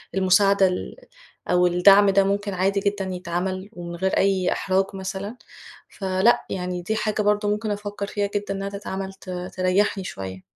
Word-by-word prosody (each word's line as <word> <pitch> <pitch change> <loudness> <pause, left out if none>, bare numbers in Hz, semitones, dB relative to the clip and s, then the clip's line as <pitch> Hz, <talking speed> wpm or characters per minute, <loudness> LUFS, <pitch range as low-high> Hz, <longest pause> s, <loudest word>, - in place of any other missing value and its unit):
المساعدة 195 +1 +4
ال 180 0 -4 0.5
أو 180 0 +4
الدعم 195 +3 +6
ده 195 0 +4
ممكن 200 +1 -1
عادي 195 +2 +1
جدًا 200 0 -1
يتعمل 185 +2 -3
ومن 175 -2 -7
غير 190 +2 0
أي 190 -2 +2
إحراج 190 0 +1
مثلًا، 195 +4 -5 0.6
فلأ 190 +3 +2
يعني 180 -1 -3
دي 215 +5 -2
حاجة 215 0 -1
برضه 210 0 +1
ممكن 210 +1 -1
أفكّر 205 0 -4
فيها 205 0 -2
جدًا 205 -1 -1
إنها 195 0 -4
تتعمل 195 -1 -5
ت 190 -1 -14
تريحني 185 +2 0
شوية. 95 - -7
195 Hz, 160 wpm, -23 LUFS, 185-205 Hz, 0.6 s, الدعم